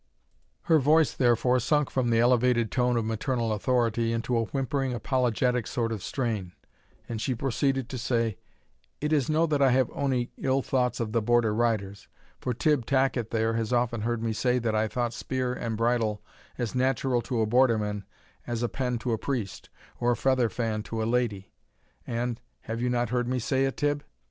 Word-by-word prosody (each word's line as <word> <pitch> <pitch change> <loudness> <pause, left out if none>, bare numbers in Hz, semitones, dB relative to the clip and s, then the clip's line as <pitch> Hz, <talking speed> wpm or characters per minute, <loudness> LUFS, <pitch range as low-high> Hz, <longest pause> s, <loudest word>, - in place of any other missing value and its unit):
Her 160 - +4
voice, 155 +2 +4
therefore, 125 +1 +3
sunk 150 +3 +1
from 130 -2 0
the 115 -1 +3
elevated 120 -1 +3
tone 125 -1 +1
of 115 - 0
maternal 115 +1 -1
authority 115 0 +1
into 115 +2 -1
a 115 -1 +1
whimpering 135 +1 -2
apologetic 125 -1 0
sort 115 -2 -1
of 110 -3 -4
strain, 110 -9 -3 0.5
and 115 -2 -4
she 130 +2 -1
proceeded 135 +1 0
to 130 - -5
say, 115 -5 0 0.6
"It 150 +1 -1
is 145 -3 +2
no 155 +2 +3
that 150 -3 0
I 135 - +6
have 130 -1 +2
ony 130 -3 -1
ill 135 0 +1
thoughts 125 -2 0
of 115 -2 -2
the 115 0 +1
Border 120 -1 +2
riders, 105 -4 -1 0.3
for 125 - -2
Tibb 130 0 +1
Tacket 130 -4 +1
there 115 0 0
has 115 0 -2
often 120 -2 +1
heard 115 +1 -1
me 115 -1 0
say 125 +3 +1
that 115 -3 -1
I 110 0 +1
thought 120 +1 -2
spear 125 +1 -2
and 115 -3 -3
bridle 115 -2 0 0.3
as 120 -3 -2
natural 130 -1 +1
to 120 -1 -2
a - - +3
Borderman 110 -4 +2 0.4
as 120 0 -2
a 120 - 0
pen 125 -2 -2
to 125 - -2
a 110 - -1
priest, 115 -9 -4 0.3
or 120 - +1
a - - -4
feather 130 -2 +2
fan 110 -3 -2
to 110 +1 -4
a - - -1
lady; 115 -5 -1 0.6
and 120 0 -2 0.2
have 115 +1 -5
you 125 - +1
not 120 -2 0
heard 125 0 0
me 130 +1 0
say 130 +3 +1
it, 135 - -3
Tibb?" 145 -1 0
120 Hz, 195 wpm, -27 LUFS, 115-130 Hz, 0.6 s, I